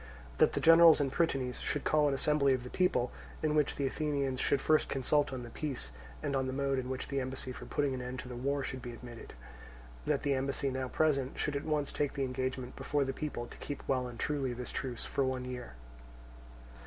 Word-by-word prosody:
That - - +5
the - - 0
generals 165 -1 +8
and 140 -2 +1
prytanes 135 -6 0
should 150 - -2
call 150 -1 +3
an 140 - +2
assembly 140 -1 +3
of 125 - -5
the 125 - -8
people, 180 -9 +2 0.3
in 155 -1 +2
which 150 -2 +2
the 140 - -1
Athenians 140 -2 -1
should 140 - +2
first 155 +2 +3
consult 140 +2 +2
on 130 -2 -4
the 120 - -9
peace, 140 - -4 0.3
and 140 - 0
on 130 -1 +1
the 130 - -2
mode 135 0 +1
in 125 0 -4
which 130 0 -3
the 140 -1 0
embassy 130 0 -4
for - - -8
putting 145 -2 0
an 130 - -3
end 125 +1 -5
to - - -10
the 125 - -6
war 140 +3 -1
should 130 -1 -4
be 120 0 -6
admitted. 120 0 -10 0.7
That - - +1
the 140 - +2
embassy 135 +1 0
now 130 0 -2
present 140 -2 +1
should 150 - -1
at 140 - -2
once 150 -2 0
take 145 -2 -1
the 140 - -1
engagement 130 -1 -3
before 145 -1 0
the 135 - -2
people 145 -5 -4
to - - -11
keep 145 - -6
well 130 -2 +1
and 120 -1 -8
truly 140 -4 0
this 125 0 -6
truce 125 -3 -3
for 140 - 0
one 130 -1 -1
year. 125 - -6
135 Hz, 230 wpm, -32 LUFS, 130-145 Hz, 0.7 s, generals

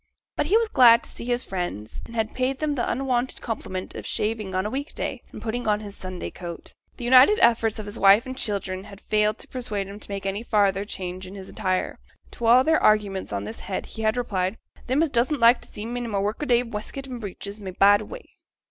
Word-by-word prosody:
But - - 0
he 405 +7 +5
was 460 0 +2
glad 240 - +6
to - - -8
see - - -8
his 245 0 -1
friends; 175 - -4
and 230 - -11
had 220 -1 -1
paid 260 +1 0
them 305 0 -1
the 250 -4 -1
unwonted 255 0 -1
compliment 190 -5 -5
of - - -7
shaving 210 -3 -2
on 185 +1 0
a - - -1
week 280 +3 -4
day, - - -3
and - - -9
putting 235 +1 -3
on 210 -1 +2
his 205 -1 -8
Sunday 185 -1 -6
coat. 175 -2 -8 0.2
The - - -7
united 260 - +7
efforts 230 -2 +3
of 210 -1 -5
wife 200 +5 +6
and 260 0 -6
children 195 -5 -3
had 200 - -12
failed 210 0 +1
to - - -7
persuade 210 -6 -3
him 200 +1 -9
to - - -8
make 195 -1 -5
any 195 +2 -2
farther 200 -3 +2
change 185 -2 -5
in 190 - -10
his 190 -1 -9
attire; 185 -4 -2 0.3
to 235 - -3
all 245 +3 +7
their 320 +3 +3
arguments 205 -3 +2
on 100 -1 -2
this 110 +2 -7
head 190 - -4
he 220 - -8
had 220 +2 +1
replied, 195 -4 -1 0.3
'Them 265 +5 +2
as 320 - -1
doesn't 260 +4 +1
like 235 +1 +6
t' - - -13
see 210 - -7
me 245 +1 -3
i' - - -4
my 205 -3 -2
work 205 +6 -1
a 295 - -2
day 240 -1 +4
wescut 235 +4 -6
and 250 -3 -7
breeches 200 +1 -7
may 195 -2 -6
bide 200 +3 +5
away.' - - -9
215 Hz, 240 wpm, -25 LUFS, 195-245 Hz, 0.3 s, united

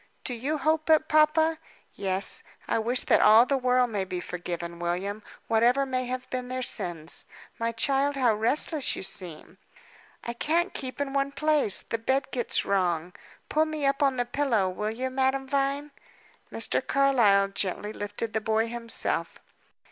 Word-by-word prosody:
"Do 250 - -2
you 270 +6 -2
hope 315 +2 0
it, 315 0 +4
papa?" 315 +1 +3 0.3
"Yes. 190 0 0 0.3
I - - +1
wish 240 +3 0
that - - +3
all 220 +3 +7
the 275 - 0
world 250 -2 +2
may 200 -3 -1
be 185 -1 -5
forgiven, 170 -1 -6
William, 185 +5 -3 0.3
whatever 240 +5 +3
may 255 -1 -2
have 255 0 -4
been 255 -1 -3
their 255 0 -3
sins. 170 -7 -1 0.3
My 230 0 0
child, 275 +5 +1
how 250 -4 +3
restless 270 +7 +2
you - - -6
seem!" 175 -4 -6 0.6
"I 235 - -4
can't 330 +9 0
keep 260 -1 -6
in 280 -1 -2
one 275 0 0
place; 300 -8 +2
the 230 - -4
bed 265 +4 -1
gets 245 -2 0
wrong. 180 -3 0 0.3
Pull 310 +1 +2
me 310 -2 -3
up 275 +1 +1
on 275 -2 +3
the 245 -1 -1
pillow, 240 -7 0
will 210 +3 -3
you 255 +4 -4
Madame 265 +1 0
Vine?" 280 +2 -1 0.6
Mr. - - 0
Carlyle 235 -8 +3
gently 200 +2 -2
lifted 205 +2 -5
the 220 - 0
boy 220 +1 +1
himself. 230 -1 -1
250 Hz, 165 wpm, -27 LUFS, 205-275 Hz, 0.6 s, all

